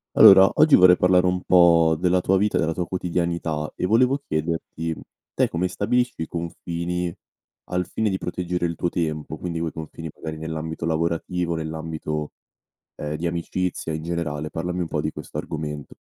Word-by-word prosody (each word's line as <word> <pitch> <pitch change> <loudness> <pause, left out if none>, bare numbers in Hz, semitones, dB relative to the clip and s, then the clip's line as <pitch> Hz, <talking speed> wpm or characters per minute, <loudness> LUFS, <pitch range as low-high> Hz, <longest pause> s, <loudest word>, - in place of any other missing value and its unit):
Allora 95 0 +9
oggi 155 -1 +5
vorrei 90 -1 +7
parlare 90 0 +4
un 90 0 0
po' 85 -2 +5
della 90 +1 +3
tua 95 +1 +2
vita, 105 +1 +1
della 80 0 +1
tua 90 0 -3
quotidianità 85 -4 -2
e - - -2
volevo 125 +6 +3
chiederti: 80 - -3 0.4
te - - +3
come 90 +2 -1
stabilisci 120 0 0
i - - -6
confini 85 +1 -4 0.5
al 90 0 -2
fine 110 -1 -1
di 95 - -1
proteggere 90 -1 -3
il 85 -1 -2
tuo 85 - -1
tempo? 80 -2 -3
Quindi 85 -1 -4
quei 80 -1 -2
confini 80 0 -7
magari 80 -1 -6
nell'ambito 80 +1 -4
lavorativo, 85 +2 -1
nell'ambito, 80 -1 -4 0.6
ehm, 75 0 -4
di 85 +3 -3
amicizia 85 0 -2
in 80 0 -4
generale, 80 -3 -3
parlami 90 +3 -3
un - - -2
po' 75 - -1
di 75 - -2
questo - - -9
argomento. 75 -2 -5
85 Hz, 170 wpm, -23 LUFS, 80-90 Hz, 0.6 s, Allora